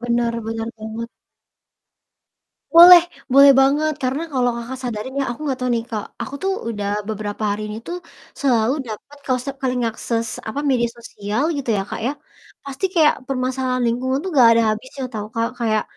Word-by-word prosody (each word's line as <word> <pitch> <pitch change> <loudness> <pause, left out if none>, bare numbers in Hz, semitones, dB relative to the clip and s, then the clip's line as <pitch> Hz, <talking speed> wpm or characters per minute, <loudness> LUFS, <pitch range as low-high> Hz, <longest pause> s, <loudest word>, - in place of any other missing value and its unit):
Benar, 235 -1 0
benar 225 0 -3
banget. 220 +2 -6 1.7
Boleh, 345 0 +11 0.3
boleh 275 +1 +8
banget, 295 +3 +3
karena 260 +4 -1
kalau 250 -2 +2
Kakak 245 +2 -6
sadarin 245 +2 -5
ya, - - +1
aku 240 - -7
nggak 265 -2 -1
tahu 250 0 -1
nih, 230 0 -2
Kak, 215 -2 -3 0.2
aku 280 - -7
tuh 390 - +1 0.2
udah 205 -3 -3 0.2
beberapa 215 0 -4
hari 205 +1 -2
ini 215 - -5
tuh, 350 - -3 0.4
selalu 245 -4 +2
dapet 240 +6 -9
ke - - -7
se 275 - -3
ke - - -7
link 250 -1 -1
akses 230 0 -3 0.2
apa, 280 +6 -3
media 240 -2 +2
sosial 210 +2 -4
gitu 275 -4 -5
ya, 195 - 0
Kak, - - -5
ya, 275 - 0 0.5
pasti 275 +5 -6
kayak 315 -3 +5
permasalahan 255 -1 -1
lingkungan 260 +3 0
tuh 380 - -3
nggak 245 -4 +7
ada 230 0 +4
habisnya 260 +5 -6
tau 210 -1 -4
Kak. 230 0 0
Kayak 220 -3 +1
245 Hz, 180 wpm, -20 LUFS, 225-270 Hz, 1.7 s, Boleh